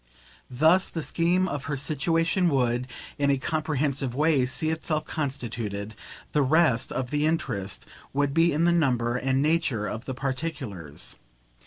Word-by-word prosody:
Thus 160 +9 +4
the 165 - -4
scheme 175 +5 +1
of 145 -5 -4
her 145 -3 -2
situation 165 +5 +1
would, 125 -3 +1 0.3
in 140 0 +2
a 140 - +3
comprehensive 145 -3 -1
way, 145 -3 +3
see 155 +4 +1
itself 155 -1 -2
constituted; 115 -8 -3 0.4
the 150 - +2
rest 135 -3 +3
of 125 -2 -3
the 150 +1 +1
interest 100 - -2 0.3
would 140 0 0
be 165 +2 +4
in 155 +3 +1
the 175 - +4
number 125 -8 +2
and 135 +2 +1
nature 150 -9 +1
of 110 +4 -5
the 130 - -4
particulars. 130 - -4
140 Hz, 150 wpm, -26 LUFS, 125-160 Hz, 0.4 s, Thus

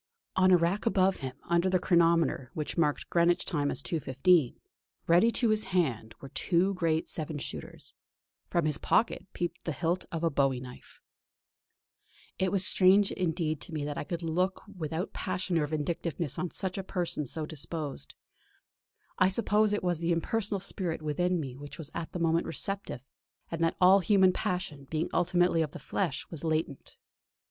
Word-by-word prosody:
On 185 0 +4
a 180 - +7
rack 175 +7 0
above 190 -3 +3
him, 130 -2 -6
under 170 +2 +1
the 185 - +3
chronometer 170 -7 +2
which 155 -2 -3
marked 150 -4 0
Greenwich 170 0 +3
time 145 -5 0
as 135 - -3
2.15, 155 -1 +2 0.5
ready 175 +7 +5
to 235 - +2
his 215 0 +2
hand, 130 - -1
were 135 - -10
two 185 +7 +1
great 165 -3 0
seven 155 -1 -5
shooters; - - -7 0.5
from 170 -2 0
his 150 -1 0
pocket 225 - +1
peeped 175 - -4
the 165 - -2
hilt 170 +4 -1
of 165 0 -4
a 165 - +2
bowie 135 -2 +1
knife. 125 0 -12 1.4
It 190 -1 +1
was 195 -2 +2 0.2
indeed 195 +2 +6
strange 160 -3 -1
to - - -12
me 150 -2 -2
that 145 -1 -4
I - - -3
could 170 +3 -5
look 180 +4 -1
without 160 +1 -4
passion 185 -2 -1
or 150 - 0
vindictiveness 160 0 -3
on 180 - -2
such 190 +2 -4
a - - -4
person 175 -6 -2
so 155 +4 -3
disposed. 150 - -6 1.0
I 185 - +6
suppose 210 +1 +2
it 210 - -1
was 175 -3 0
the 170 +1 0
impersonal 200 +4 0
spirit 175 -4 -3
within 175 +4 0
me 135 -5 -5
which 145 +2 -9
was 160 -3 -7
at 165 - -5
the 180 - -5
moment 165 0 +1
receptive, 195 - -2 0.5
and 165 0 -2
that 165 - +1
all 185 +2 +7
human 190 0 +4
passion, 180 -8 -3
being 160 0 -2
ultimately 175 -1 +2
of 150 -3 -2
the - - -6
flesh, 165 -8 -2
was 165 -3 -4
latent. 155 -3 -2
170 Hz, 175 wpm, -29 LUFS, 155-185 Hz, 1.4 s, a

